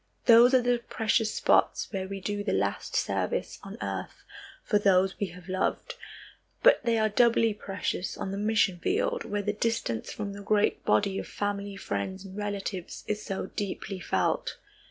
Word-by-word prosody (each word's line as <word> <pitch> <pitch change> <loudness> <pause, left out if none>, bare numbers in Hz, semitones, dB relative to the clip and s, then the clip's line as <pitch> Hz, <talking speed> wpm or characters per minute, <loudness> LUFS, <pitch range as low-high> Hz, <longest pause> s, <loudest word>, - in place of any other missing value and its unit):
Those 240 +2 +7
are 245 -1 +3
precious 225 -1 0
spots - - +2
where 190 -1 -2
we 195 0 -5
do 205 +2 -3
the - - -1
last - - -1
service - - -1
on - - -9
earth - - -5 0.4
for 210 - +2
those 190 -1 +3
we 200 - 0
have 180 0 -12
loved, 185 0 -1 0.7
but - - +6
they 235 -1 +2
are 220 0 +3
doubly 230 0 +3
precious 195 -2 -3
on 190 - -4
the 195 - -3
mission 205 -4 +2
field 485 - 0
where 205 0 -2
the 210 +1 0
distance 215 - -2
from 205 -1 -5
the 205 - -8
great 205 +1 +1
body 200 -1 +2
of - - -6
family 205 -1 -3
friends 190 - -4
and 190 0 -10
relatives 200 -3 -4
is 210 0 -2
so 190 -2 -4
deeply 195 -1 -4
felt. - - -1
205 Hz, 170 wpm, -28 LUFS, 195-220 Hz, 0.7 s, Those